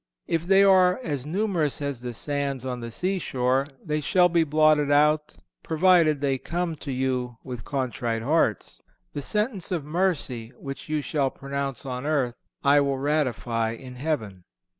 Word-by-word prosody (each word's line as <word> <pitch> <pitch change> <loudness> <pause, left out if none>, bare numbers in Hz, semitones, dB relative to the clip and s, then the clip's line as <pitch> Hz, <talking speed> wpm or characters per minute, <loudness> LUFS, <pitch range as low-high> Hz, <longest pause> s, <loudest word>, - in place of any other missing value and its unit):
(442) - - 0
If 175 - -11
they 195 0 +7
are 185 0 +5
as 145 - -3
numerous 175 -4 0
as 140 -4 -4
the 120 -1 -5
sands 140 -1 -2
on 125 -1 -3
the 115 -1 -6
seashore, 135 - 0 0.2
they 150 -1 -1
shall 180 +4 +4
be 170 -1 +3
blotted 155 -1 +3
out, 150 +1 +3 0.3
provided 165 -3 +3
they 135 -2 0
come 170 +1 -2
to 145 -1 -6
you 125 -2 -1
with 125 -4 -7
contrite 120 -4 -2
hearts. 135 - 0 0.3
The 145 - -4
sentence 210 - -1
of 165 -6 -2
mercy 150 -8 -1
which 135 +2 -8
you 155 -1 -1
shall 140 -2 0
pronounce 140 -1 -5
on 130 +1 -4
earth 135 -6 0 0.3
I 145 +1 +5
will 140 -1 0
ratify 125 -6 0
in 125 +2 -10
heaven. 110 - -3
145 Hz, 160 wpm, -25 LUFS, 130-160 Hz, 0.3 s, they